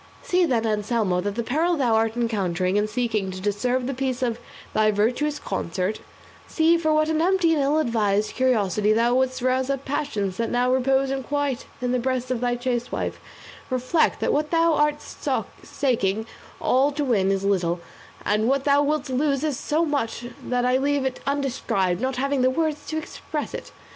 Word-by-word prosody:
See, 360 Hz, -1 st, +2 dB
then, 235 Hz, -5 st, +1 dB
Anselmo, 210 Hz, -3 st, 0 dB
the 205 Hz, +4 st, -2 dB
peril 325 Hz, +8 st, +1 dB
thou 250 Hz, -5 st, +2 dB
art 225 Hz, +1 st, +1 dB
encountering 190 Hz, -6 st, 0 dB
in 210 Hz, +1 st, +2 dB
seeking 215 Hz, -3 st, -1 dB
to 185 Hz, 0 st, -6 dB
disturb 245 Hz, +6 st, 0 dB
the 275 Hz, -, -2 dB
peace 260 Hz, -1 st, -2 dB
of 235 Hz, -1 st, -1 dB, 0.3 s
thy 215 Hz, 0 st, +3 dB
virtuous 245 Hz, +8 st, +1 dB
consort; 190 Hz, -, -3 dB, 0.5 s
see 325 Hz, +1 st, +3 dB
for 320 Hz, -2 st, +1 dB
what 310 Hz, 0 st, +3 dB
an 315 Hz, 0 st, +1 dB
empty 355 Hz, -2 st, +3 dB
and 300 Hz, -, +1 dB
ill 280 Hz, +2 st, +2 dB
advised 215 Hz, -7 st, +1 dB
curiosity 215 Hz, -5 st, +2 dB
thou 235 Hz, +2 st, +2 dB
wouldst 260 Hz, 0 st, 0 dB
rouse 255 Hz, +1 st, +1 dB
up 275 Hz, 0 st, -2 dB
passions 220 Hz, -10 st, -2 dB
that 230 Hz, 0 st, -1 dB
now 245 Hz, +1 st, +2 dB
repose 265 Hz, +1 st, +2 dB
in 270 Hz, 0 st, -1 dB
quiet 285 Hz, -1 st, -2 dB, 0.2 s
in 250 Hz, -, 0 dB
the 250 Hz, -, +1 dB
breast 255 Hz, 0 st, -1 dB
of 245 Hz, -2 st, -1 dB
thy 245 Hz, 0 st, +1 dB
chaste 245 Hz, -1 st, -2 dB
wife; -, -, -3 dB, 0.5 s
reflect 255 Hz, +5 st, +1 dB
that -, -, +1 dB
what 300 Hz, +1 st, 0 dB
thou 330 Hz, -1 st, +3 dB
art 295 Hz, 0 st, +1 dB, 0.6 s
staking 220 Hz, -6 st, 0 dB, 0.3 s
all 270 Hz, +3 st, +3 dB
to 290 Hz, 0 st, -2 dB
win 200 Hz, -7 st, +2 dB
is 195 Hz, 0 st, 0 dB
little, 180 Hz, -3 st, +1 dB, 0.5 s
and 215 Hz, +2 st, +2 dB
what 275 Hz, 0 st, +1 dB
thou 285 Hz, 0 st, +4 dB
wilt 295 Hz, 0 st, 0 dB
lose 280 Hz, +2 st, 0 dB
so 310 Hz, +6 st, 0 dB
much 245 Hz, -6 st, -2 dB, 0.2 s
that 245 Hz, 0 st, 0 dB
I 250 Hz, +1 st, +3 dB
leave 280 Hz, 0 st, +1 dB
it 260 Hz, -, -2 dB
undescribed, 235 Hz, -10 st, 0 dB
not 260 Hz, 0 st, -1 dB
having 275 Hz, +1 st, 0 dB
the 255 Hz, -, +4 dB
words 295 Hz, +1 st, -1 dB
to 315 Hz, -, -3 dB
express 305 Hz, -1 st, -5 dB
it. -, -, -7 dB
255 Hz, 185 wpm, -24 LUFS, 220-285 Hz, 0.6 s, thou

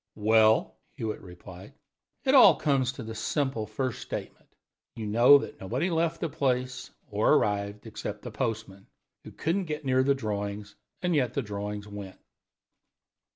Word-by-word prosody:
"Well," 110 Hz, -9 st, +3 dB, 0.2 s
Hewitt 110 Hz, -1 st, -4 dB
replied, 90 Hz, +1 st, -12 dB, 0.5 s
"it -, -, +2 dB
all -, -, +8 dB
comes 135 Hz, -4 st, +1 dB
to 130 Hz, -, -8 dB
the 110 Hz, 0 st, -6 dB
simple 115 Hz, 0 st, -2 dB
first 125 Hz, +4 st, -3 dB
statement. -, -, -7 dB, 0.5 s
You 115 Hz, -2 st, -5 dB
know 120 Hz, +7 st, +7 dB
that 140 Hz, -, -7 dB
nobody 130 Hz, -, -1 dB
left 165 Hz, 0 st, 0 dB
the 165 Hz, -, 0 dB
place 125 Hz, -2 st, -1 dB, 0.2 s
or -, -, +3 dB
arrived, 100 Hz, 0 st, -1 dB
except 105 Hz, -1 st, -6 dB
the 120 Hz, -, -6 dB
postman, 105 Hz, -2 st, -4 dB, 0.4 s
who -, -, -10 dB
couldn't 180 Hz, +4 st, -1 dB
get 150 Hz, -2 st, -5 dB
near 130 Hz, -1 st, +3 dB
the 140 Hz, +1 st, +3 dB
drawings, 105 Hz, -3 st, -4 dB, 0.3 s
and 180 Hz, -1 st, +1 dB
yet 125 Hz, -6 st, +1 dB
the 140 Hz, -, 0 dB
drawings 105 Hz, 0 st, -5 dB
went. 100 Hz, -2 st, -9 dB
110 Hz, 155 wpm, -28 LUFS, 105-135 Hz, 0.5 s, all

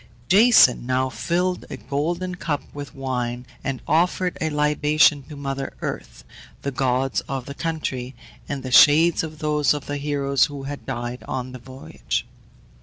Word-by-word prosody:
Jason 205 Hz, -, +6 dB
now 130 Hz, 0 st, +1 dB
filled 175 Hz, -, -1 dB
a 140 Hz, -, -6 dB
golden 155 Hz, -, -2 dB
cup 150 Hz, -4 st, -3 dB
with 145 Hz, -1 st, -8 dB
wine, 125 Hz, -2 st, -3 dB, 0.2 s
and 135 Hz, -2 st, -4 dB
offered 180 Hz, +2 st, +1 dB
a 160 Hz, -, +1 dB
libation 150 Hz, 0 st, +3 dB
to 140 Hz, +3 st, -11 dB
mother 135 Hz, -1 st, -4 dB
earth, -, -, -5 dB, 0.4 s
the 140 Hz, -, -2 dB
gods 130 Hz, 0 st, 0 dB
of 135 Hz, -2 st, -3 dB
the 140 Hz, -, -7 dB
country, 135 Hz, -5 st, -4 dB, 0.3 s
and 140 Hz, -2 st, -4 dB
the 130 Hz, -, -5 dB
shades 155 Hz, +6 st, +6 dB
of 155 Hz, -1 st, -6 dB
those 150 Hz, -1 st, +1 dB
of 145 Hz, -, -6 dB
the 145 Hz, -, -3 dB
heroes 140 Hz, -2 st, +1 dB
who 140 Hz, -2 st, -7 dB
had 140 Hz, +1 st, -7 dB
died 120 Hz, +1 st, -4 dB
on 130 Hz, -1 st, -4 dB
the 130 Hz, -, -9 dB
voyage. 130 Hz, +2 st, -5 dB
140 Hz, 160 wpm, -23 LUFS, 130-155 Hz, 0.4 s, Jason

